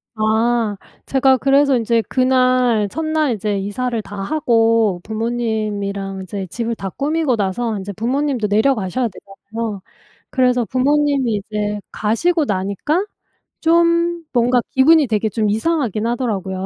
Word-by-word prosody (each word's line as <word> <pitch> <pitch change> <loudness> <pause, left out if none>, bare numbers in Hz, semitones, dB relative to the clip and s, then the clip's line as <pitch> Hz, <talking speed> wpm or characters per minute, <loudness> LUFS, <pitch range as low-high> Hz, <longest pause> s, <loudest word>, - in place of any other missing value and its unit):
아. 220 0 +1 0.3
제가 265 -1 +3
그래서 275 +1 +3
인제 230 0 +1
그날 255 -4 +2
첫 320 +6 -4
날 310 -5 +1
이제 210 -1 -2
이사를 230 +4 -2
다 205 - -10
하고 225 - +2
부모님이랑 215 -4 -3
이제 190 +1 -5
집을 230 +5 -3
다 195 -2 -5
꾸미고 295 - 0
나서 210 +2 -2
이제 200 +1 -6
부모님도 250 +1 -1
내려가셔야 220 +1 +1
되잖아요. 205 +1 -7 0.5
그래서 250 -2 +2
부모님이 275 -2 +1
이제 210 -1 -3
가시고 300 +10 +1
나니까 200 - -1 0.6
좀 335 0 +2
뭔가 245 0 +3
기분이 295 +2 +5
되게 220 0 0
좀 215 -1 0
이상하긴 225 - 0
하더라고요. 195 -6 -2
230 Hz, 300 characters per minute, -19 LUFS, 210-270 Hz, 0.6 s, 기분이